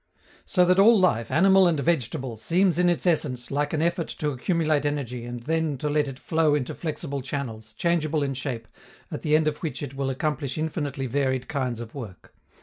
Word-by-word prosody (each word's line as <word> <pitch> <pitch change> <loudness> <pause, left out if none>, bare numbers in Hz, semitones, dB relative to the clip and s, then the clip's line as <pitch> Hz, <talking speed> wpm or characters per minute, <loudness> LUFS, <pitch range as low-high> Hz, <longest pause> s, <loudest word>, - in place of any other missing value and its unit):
So 180 -2 +3
that 180 +1 +4
all 220 +2 +7
life, 115 -12 +2
animal 190 +2 +5
and 165 -4 +1
vegetable, 130 -5 -1
seems 175 - +1
in 180 0 +4
its 175 - 0
essence 135 -8 0
like 145 +1 0
an 155 0 0
effort 170 0 0
to 150 -1 -1
accumulate 155 +1 0
energy 130 -5 -3
and 120 0 -6
then 160 0 0
to 150 +4 -2
let 150 -1 +2
it 135 -2 -6
flow 160 0 +2
into 135 -4 -2
flexible 150 -3 -4
channels, 115 -5 -5
changeable 155 +2 0
in 135 -1 -1
shape, 125 -3 -4 0.4
at - - -5
the 150 0 +2
end 155 0 +3
of 150 -1 0
which 160 -2 -4
it 140 -2 -6
will 135 0 -2
accomplish 140 0 -2
infinitely 145 -4 -2
varied 130 0 -1
kinds 130 -5 -2
of 115 -1 -8
work. 110 -10 -9
145 Hz, 200 wpm, -25 LUFS, 130-160 Hz, 0.4 s, all